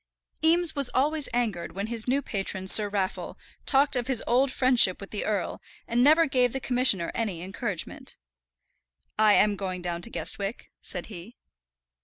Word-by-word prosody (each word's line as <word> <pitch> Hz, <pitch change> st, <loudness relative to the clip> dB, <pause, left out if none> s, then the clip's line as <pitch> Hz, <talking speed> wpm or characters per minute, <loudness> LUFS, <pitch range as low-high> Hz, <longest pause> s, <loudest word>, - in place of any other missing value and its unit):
Eames 335 Hz, +1 st, +2 dB
was 280 Hz, -3 st, +2 dB
always 295 Hz, +2 st, +1 dB
angered 225 Hz, -8 st, -2 dB
when 200 Hz, +3 st, -4 dB
his 225 Hz, 0 st, -1 dB
new 275 Hz, +3 st, 0 dB
patron 195 Hz, -3 st, -2 dB
Sir 205 Hz, +2 st, +7 dB
Raffle 195 Hz, -2 st, -4 dB, 0.3 s
talked 275 Hz, 0 st, +2 dB
of 245 Hz, -1 st, -2 dB
his 260 Hz, -4 st, 0 dB
old 260 Hz, +3 st, +1 dB
friendship 250 Hz, -8 st, +4 dB
with 200 Hz, -, -11 dB
the 210 Hz, -, -4 dB
earl, 205 Hz, -4 st, -3 dB, 0.3 s
and 240 Hz, +1 st, +1 dB
never 315 Hz, +4 st, +5 dB
gave 250 Hz, -4 st, +1 dB
the 265 Hz, -, -3 dB
Commissioner 250 Hz, -9 st, +1 dB
any 195 Hz, -7 st, -4 dB
encouragement. 190 Hz, +2 st, -5 dB, 1.0 s
"I 215 Hz, -1 st, +5 dB
am 210 Hz, 0 st, +3 dB
going 185 Hz, -2 st, -5 dB
down 175 Hz, -1 st, -4 dB
to 230 Hz, -, -6 dB
Guestwick," 200 Hz, -1 st, -4 dB
said 180 Hz, -2 st, -6 dB
he. 210 Hz, +2 st, -11 dB
230 Hz, 165 wpm, -26 LUFS, 195-260 Hz, 1.0 s, Sir